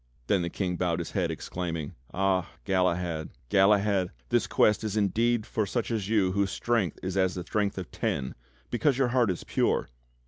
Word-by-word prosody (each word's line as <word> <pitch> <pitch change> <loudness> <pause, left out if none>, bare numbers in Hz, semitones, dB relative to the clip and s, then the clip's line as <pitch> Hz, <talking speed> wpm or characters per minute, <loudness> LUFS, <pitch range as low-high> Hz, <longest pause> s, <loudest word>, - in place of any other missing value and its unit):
Then 95 +8 +2
the 85 - -2
King 90 -1 -2
bowed 85 -2 0
his 85 -2 -4
head, - - 0
exclaiming: 85 -4 -4 0.2
"Ah! 95 -2 +1 0.2
Galahad, 90 -4 0 0.2
Galahad! 100 -1 +4 0.2
This - - +2
Quest 105 +1 +3
is 110 -1 -2
indeed 110 +3 +2
for 110 -2 -1
such 120 +3 -2
as 105 -3 -2
you 100 -5 +3
whose 100 +1 +1
strength 110 -7 0
is 95 0 -3
as 95 -1 +2
the 90 - -4
strength 100 +1 -1
of 90 -3 -6
ten 65 -2 -2 0.4
because 130 +2 +2
your 135 -2 +2
heart 120 -3 +3
is 90 - -2
pure!" - - 0
95 Hz, 180 wpm, -28 LUFS, 90-110 Hz, 0.4 s, Galahad